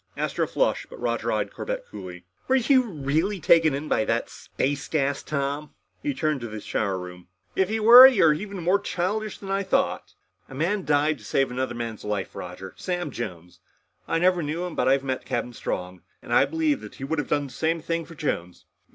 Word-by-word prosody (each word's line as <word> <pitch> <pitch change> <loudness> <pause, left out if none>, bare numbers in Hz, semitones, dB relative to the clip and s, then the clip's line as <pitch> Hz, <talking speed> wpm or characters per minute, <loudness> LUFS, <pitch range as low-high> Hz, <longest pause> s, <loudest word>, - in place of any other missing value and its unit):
Astro - - -1
flushed, - - 0
but - - -11
Roger - - -1
eyed - - -1
Corbett - - -4
coolly. 90 - -9 0.2
"Were 260 - +3
you 260 +1 +4
really 165 - -1
taken 160 -2 +4
in 145 +2 -5
with 110 - +1
that 115 +1 -1
space 140 +1 -3
gas, 140 -2 0
Tom?" 140 +1 -3 0.3
He 290 -2 -2
turned 155 -4 0
to 120 - -4
the 110 -1 -6
shower 100 -1 -2
room. 90 -1 -9 0.3
"If 190 0 +2
you 220 0 -1
were, 245 +4 +11
then 255 - -3
you're 160 +1 +4
more 180 +4 +2
childish 205 +3 -2
than 195 -1 -7
I 195 0 +1
thought." 195 - -1 0.3
"A 135 - -9
man 185 +7 -1
died 150 0 +2
to - - -16
save 135 -2 0
another 125 -1 -2
man's 115 -2 -5
life, 105 -2 -3
Roger. 90 +1 -8
Sam 175 -4 -3
Jones. 90 -7 -7 0.5
I - - +1
never 180 +1 +3
knew 160 +4 -3
him. 180 - -5
But 125 - 0
I've 135 +1 +3
met 130 -1 -3
Captain 120 - -3
Strong, 90 -5 -5 0.2
and - - -4
I - - +6
believe 315 -3 0
that - - -10
he 135 - -9
would 150 +3 -1
have 145 - -3
done 145 -1 +1
the 135 - -10
same 165 +1 0
thing 165 +1 -2
for 165 +1 -13
Jones." 90 - -4
150 Hz, 210 wpm, -25 LUFS, 125-190 Hz, 0.5 s, were